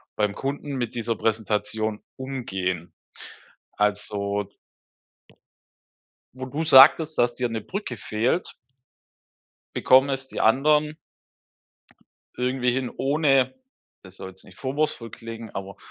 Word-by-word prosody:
beim 105 -1 0
Kunden 140 +1 -4
mit 120 -2 -3
dieser 115 -1 -1
Präsentation 110 0 -1
umgehen. 95 -10 -4 0.8
Also 100 -1 -1 1.8
wo 130 0 -6
du 145 +5 -3
sagtest, 155 +2 +7
dass 120 0 +2
dir 125 -2 -1
'ne 110 -1 -3
Brücke 190 - -5
fehlt 115 - -1 1.2
bekommen 130 +2 +5
es 135 0 -2
die - - -6
anderen 150 +6 +3 1.4
irgendwie 125 0 +1
hin 130 0 -2
ohne, 135 -2 +2 0.5
das 95 -1 -14
soll 95 - -7
jetzt 95 0 -15
nicht 95 - -17
vorwurfsvoll 135 -3 -2
klingen, 115 -1 -8
aber 100 0 -6
120 Hz, 110 wpm, -24 LUFS, 105-135 Hz, 1.8 s, sagtest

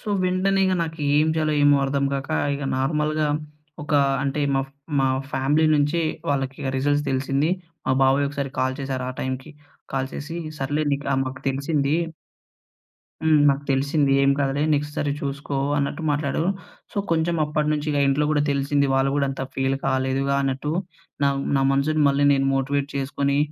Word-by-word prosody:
So, - - -22 0.2
వెంటనే 185 +2 +1
ఇగ 185 - +2
నాకేం 150 -1 +1
చేయాలో 155 -1 +1
ఏమో 145 0 +6
అర్థం 140 0 0
కాక, 135 0 -3 0.2
ఇగ 140 0 -4
నార్మల్‌గా 150 +3 0 0.6
ఒకా 145 -1 +2 0.2
అంటే 140 +1 -1
మా 135 - +2
ఫ్ 135 - -26 0.3
మా 135 - +3 0.3
ఫ్యామిలీ 145 +4 +2
నుంచి 145 +3 +2 0.3
వాళ్ళకిగ 135 -1 -2
రిజల్ట్స్ 145 +2 +1
తెలిసింది. 135 +4 0 0.4
మా 130 - +3
బాబాయ్ 135 +2 +3
ఒకసారి 140 -1 -4
కాల్ 130 0 0
చేసారు 130 -2 -3
ఆ - - -5
టైమ్‌కి. 130 +3 -4 0.4
కాల్ 135 0 -1
చేసి 155 +4 -6 0.2
సర్లేండి 145 +1 0
ఇట్లా 140 -1 -1
మాకు 130 0 -6
తెలిసింది. 140 +2 0 1.3
హ్మ్. 155 -2 +4
నాకు 140 +1 +1
తెలిసింది. 140 +1 +2
ఏం 135 - +4
కాదులే 140 0 0
నెక్స్ట్ 150 +1 -2
సారి 145 -2 0
చూసుకో 140 0 -4 0.2
అన్నట్టు 145 +4 -2
మాట్లాడు. 145 +1 0 0.5
సో, - - -16 0.2
కొంచెం 165 +1 +1
అప్పట్నుంచి 150 0 -1
ఇగ 145 - 0
ఇంట్లో 140 +2 +2
కూడా 150 -1 +2
తెలిసింది. 140 0 +1
వాళ్ళు 135 0 +2
గూడా 140 -1 +1
అంత 135 - -6
ఫీల్ 135 0 0
కాలేదుగా 135 +1 0
అన్నట్టు, 135 +2 -2 0.5
నా - - +5 0.3
నా - - +2
మనసుని 150 +3 +1
మళ్ళీ 140 +1 +2
నేను 135 -1 +2
మోటివేట్ 140 +1 0
చేసుకొని, 140 +1 0
140 Hz, 160 wpm, -23 LUFS, 135-150 Hz, 1.3 s, ఏమో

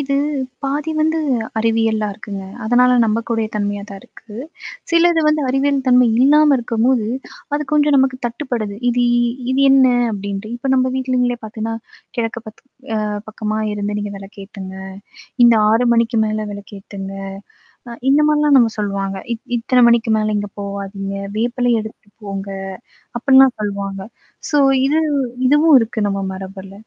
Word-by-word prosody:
இது 275 0 -1 0.5
பாதி 290 +3 -2
வந்து 315 +1 +1 0.4
அறிவியலா 225 -1 +1
இருக்குங்க. 200 -1 -8 0.2
அதனால 250 +3 +4
நம்பக்கூடிய 225 0 -1
தன்மையா 205 -1 -2
தான் 195 -1 -9
இருக்கு. 215 - -17 0.6
சிலது 335 0 +4
வந்து 305 0 +1
அறிவியல் 275 +2 +1
தன்மை 250 0 +5
இல்லாம 295 +1 +5
இருக்கும்போது, 235 0 0 0.5
அது 295 - 0
கொஞ்சம் 295 -1 +3
நமக்கு 265 -1 +2
தட்டுப்படுது 235 -5 -4
இது 245 0 +2 0.5
இது 265 +1 +1
என்ன? 270 -1 +6 0.2
அப்பிடின்ட்டு. 200 +1 -5
இப்ப 265 +2 -3
நம்ம 255 0 +2
வீட்டலங்களே 250 -2 0
பாத்தேன்னா, 220 +1 -4 0.4
கிழக்கு 230 -1 -3
பாத் 220 - -12 0.4
அ - - -2 0.2
பக்கமாக 215 0 -3
இருந்து 205 0 -3
நீங்க 205 0 -5
விளக்கு 195 +1 -13
ஏத்துங்க, 190 -1 -9 0.7
இந்த 235 -1 +6 0.2
6 230 +3 +3
மணிக்கு 230 0 +1
மேலே 215 0 -2
விளக்கேத்துங்க. 200 -1 -9 0.8
அ - - -7 0.2
இந்த 285 +2 +4
மாரிலாம் 300 -1 +4
நம்ம 230 -3 +3
சொல்லுவாங்க. 195 -1 -2 0.2
இத் 225 - -12
இத்தன 250 +1 +3
மணிக்கு 235 -1 +2
மேல 215 0 0
இங்க 205 0 -5
போவாதீங்க. 200 0 -5 0.2
வேப்பிலை 245 +1 0
எடுத்து 220 -1 -11 0.2
போங்க. 195 0 -5 0.7
அப்பிடின்லாம் 265 0 +5
சொல்லுவாங்க. 200 -1 -4 0.5
சோ 295 - +2 0.3
இது 305 +3 +2 0.5
இதுவும் 295 +2 +5
இருக்கு 225 0 -3
நம்ம 195 0 -2
மரபில. 190 0 -9
225 Hz, 140 wpm, -18 LUFS, 205-260 Hz, 0.8 s, என்ன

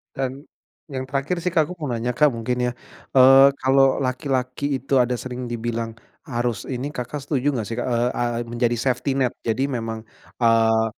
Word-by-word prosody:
Dan, 135 +1 -3 0.5
yang 130 -1 -4
terakhir 140 +6 -1
sih 175 - -4
Kak 160 - +5
aku - - -3
mau 150 - -3
nanya 120 0 -1
Kak 150 +5 +4
mungkin 125 +2 -2
ya, - - -1 0.4
eee, 135 +1 +8
kalau 135 0 +3
laki-laki 130 +1 -1
itu 135 0 +1
ada 125 0 +2
sering 125 0 -6
dibilang 115 -1 -3 0.3
harus 120 -5 -2
ini 135 +2 -3
Kakak 135 +1 -5
setuju 145 -1 -1
nggak 115 - -1
sih 115 - -4
Kak, 120 - -2
eee 120 0 +1
eee, 120 0 -1
menjadi 120 0 0
safety 125 +3 -1
net. 130 -3 +1
Jadi 130 +5 -1
memang, 115 -2 -4 0.4
eee, 115 -1 +4
125 Hz, 180 wpm, -23 LUFS, 120-135 Hz, 0.5 s, eee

